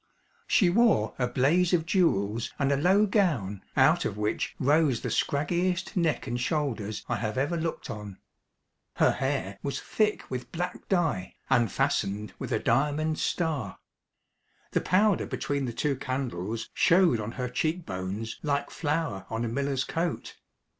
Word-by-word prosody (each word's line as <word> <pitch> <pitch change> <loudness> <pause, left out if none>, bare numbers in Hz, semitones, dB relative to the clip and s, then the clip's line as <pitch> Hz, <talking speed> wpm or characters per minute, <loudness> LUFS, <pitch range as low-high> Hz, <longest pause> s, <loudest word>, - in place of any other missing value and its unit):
She 180 -4 +4
wore 210 - +3
a 125 - +2
blaze 160 +9 +2
of 160 -2 -1
jewels 115 - +1
and 140 -1 +1
a - - +4
low 185 +8 +4
gown 150 - +1 0.2
out - - +5
of 100 - -3
which 105 +1 -1
rose 145 -2 +3
the - - -3
scraggiest 175 +5 0
neck 165 -5 +1
and 120 +1 -3
shoulders 125 -8 -2
I 120 - -1
have 110 +2 -3
ever 145 +6 +1
looked 165 0 -3
on. 105 -2 -7 0.8
Her - - +4
hair 130 -8 -2
was 140 - -3
thick 215 -1 0
with 125 -1 -6
black 180 +1 -4
dye 160 - 0 0.2
and 115 -5 +3
fastened 105 +2 -1
with - - -5
a - - +2
diamond 150 +5 +1
star. 150 - -1 0.9
The - - +1
powder 200 +1 +2
between 140 -1 -2
the 120 - -3
two 140 +4 0
candles 120 -6 -4
showed 175 -9 +4
on 110 +2 -4
her 125 -1 -3
cheek 155 +7 -1
bones 95 +4 -4
like 140 -2 -1
flour 145 - -2
on 115 +1 -2
a - - -1
miller's 135 +2 -1
coat. 170 0 -3
140 Hz, 155 wpm, -28 LUFS, 115-165 Hz, 0.9 s, out